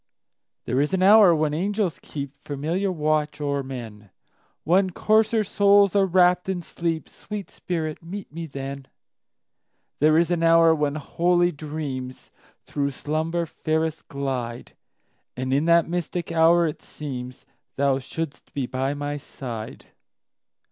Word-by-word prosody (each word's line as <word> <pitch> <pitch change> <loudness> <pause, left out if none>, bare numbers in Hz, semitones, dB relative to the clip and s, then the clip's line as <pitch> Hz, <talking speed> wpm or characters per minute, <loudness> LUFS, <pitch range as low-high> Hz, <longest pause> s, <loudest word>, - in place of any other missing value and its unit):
There 130 +3 +1
is 150 +6 +1
an 185 - +1
hour 200 -3 +7
when 155 -1 0
angels 195 +2 -1
keepFamiliar 150 +6 -3
watch 155 -2 0
o'er 140 -1 -1
men, 115 -6 -8 0.5
When 185 +4 +3
coarser 220 +4 +2
souls 200 0 +4
are 195 -1 +4
wrapp'd 180 0 +3
in 180 -2 -2
sleep—Sweet 170 +5 -5
spirit, 160 -3 -4
meet 185 +2 -8
me 165 0 -5
then! 135 -1 -6 1.1
There 155 +2 +5
is 170 +1 +2
an 175 -1 +1
hour 165 0 +6
when 150 -2 0
holy 175 +3 +1
dreamsThrough 140 -1 -6
slumber 160 +5 -2
fairest 160 0 -2
glide; 130 -4 -4 0.6
And 130 +1 -1
in 145 +3 +2
that 170 -1 +4
mystic 175 0 -3
hour 165 +1 +5
it 155 - -3
seemsThou 135 0 -4
shouldst 150 +2 -6
be 140 -3 -1
by 130 +3 -2
my 145 0 -3
side. 120 -6 -8
155 Hz, 125 wpm, -24 LUFS, 140-175 Hz, 1.1 s, hour